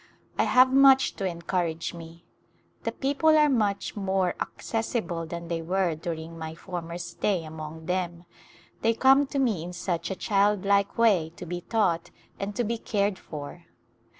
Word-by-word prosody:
I - - +2
have 255 +1 +5
much 270 -1 +6
to 195 - -2
encourage 170 -1 -2
me. 170 0 -11 0.6
The - - 0
people 285 +3 +2
are 300 0 +6
much 210 -5 0
more 190 -2 0
ac - - -4 0.2
cessible 215 -8 -2
than 170 0 -6
they 165 -1 -2
were 180 +1 0
during 165 0 -6
my 160 0 -6
former 170 0 -6
stay 175 +1 -1
among 155 +1 -8
them; 175 -1 -2 0.6
they 225 0 +2
come 270 +3 +5
to 280 - -4
me 230 -11 +1
in 175 +1 -7
such 175 -1 -2
a 190 - -2
childlike 200 0 +2
way 190 -9 +3
to 180 - -8
be 175 +1 -4
taught 175 -6 0 0.3
and 200 +1 -4
to 245 - 0
be 230 +1 -2
cared 200 -3 0
for. 155 +3 -8
185 Hz, 165 wpm, -27 LUFS, 170-220 Hz, 0.6 s, much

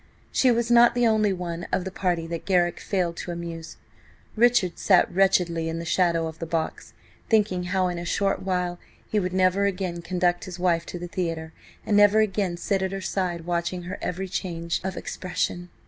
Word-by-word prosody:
She 260 - +3
was 235 0 +1
not 240 0 +6
the 245 -1 +3
only 215 -2 +3
one 175 -2 -4
of 185 - 0
the 190 - -4
party 175 -3 -1
that 165 0 -5
Garrick 175 -2 +2
failed 175 -4 -1
to - - -6
amuse. 170 -1 -6 0.6
Richard 235 -6 +3
sat 185 -3 +4
wretchedly 175 -3 +2
in 165 - -3
the 170 - -5
shadow 170 -1 +2
of 160 0 -7
the 165 - -4
box, 160 -1 -3 0.4
thinking 205 -5 +2
how, 185 0 +1
in 175 -1 -3
a - - -5
short 195 +3 0
while, 180 -2 -2 0.3
he 215 - +2
would 180 -2 -2
never 185 +1 +2
again 180 -3 -3
conduct 175 0 0
his 180 -1 -7
wife 175 -2 +1
to - - -5
the 175 0 -6
theatre 165 -3 -3 0.3
and 210 - +1
never 205 +1 +6
again 195 -4 0
sit 195 +2 -1
at 190 0 -1
her 195 - -3
side 185 -3 -2
watching 175 +1 -2
her 180 +3 -6
every 185 +2 -3
change 170 -2 -3
of 190 0 -4
expression. 175 -1 -3
180 Hz, 195 wpm, -25 LUFS, 170-195 Hz, 0.6 s, not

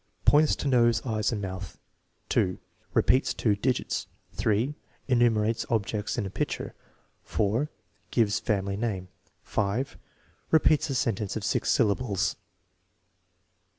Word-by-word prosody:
Points 150 +1 +5
to - - -3
nose, 120 -3 +3
eyes, 110 -2 0
and 105 -3 -3
mouth. 95 -1 -6 0.5
2. 90 -1 +1 0.4
Repeats 130 +2 +3
two 105 -3 +2
digits. 125 +5 -1 0.3
3. 110 +7 +1 0.3
Enumerates 115 -3 +2
objects 105 -1 -1
in 115 - -1
a 95 - -5
picture. - - -3 0.5
4. 110 +8 0 0.4
Gives 110 -3 +2
family 100 -3 -1
name. 100 -5 -2 0.3
5. 110 +7 -1 0.5
Repeats 155 -2 +4
a 135 - -1
sentence 105 -5 -1
of 110 - -3
six 105 - 0
syllables. 105 -4 +1
110 Hz, 120 wpm, -27 LUFS, 100-125 Hz, 0.5 s, Points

